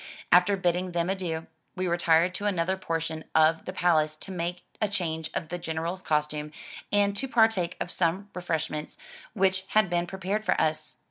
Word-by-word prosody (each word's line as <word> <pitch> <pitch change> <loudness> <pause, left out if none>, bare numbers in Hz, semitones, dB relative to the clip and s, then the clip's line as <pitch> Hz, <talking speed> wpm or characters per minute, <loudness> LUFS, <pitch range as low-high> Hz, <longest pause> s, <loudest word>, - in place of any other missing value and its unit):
After 180 +3 +6
bidding 180 0 0
them 170 +2 +1
adieu, 170 -4 -3 0.3
we 185 -1 -1
retired 170 0 +3
to 205 +2 -2
another 185 -1 +1
portion 165 -3 -3
of 160 +1 +4
the - - -4
palace 160 -4 +2
to 190 - -9
make 175 0 -3 0.2
a 215 - +3
change 160 -5 -2
of 160 - -3
the 175 - -4
General's 165 +3 -3
costume, 150 -2 -1 0.4
and 200 -1 +3
to 270 +6 -2
partake 220 -9 +2
of 175 - -3
some 185 +3 0
refreshments 160 -3 -3 0.4
which 190 -2 +2
had 215 -4 +4
been 175 0 +1
prepared 190 +3 -2
for - - +1
us. 155 -4 -1
175 Hz, 175 wpm, -28 LUFS, 160-190 Hz, 0.4 s, After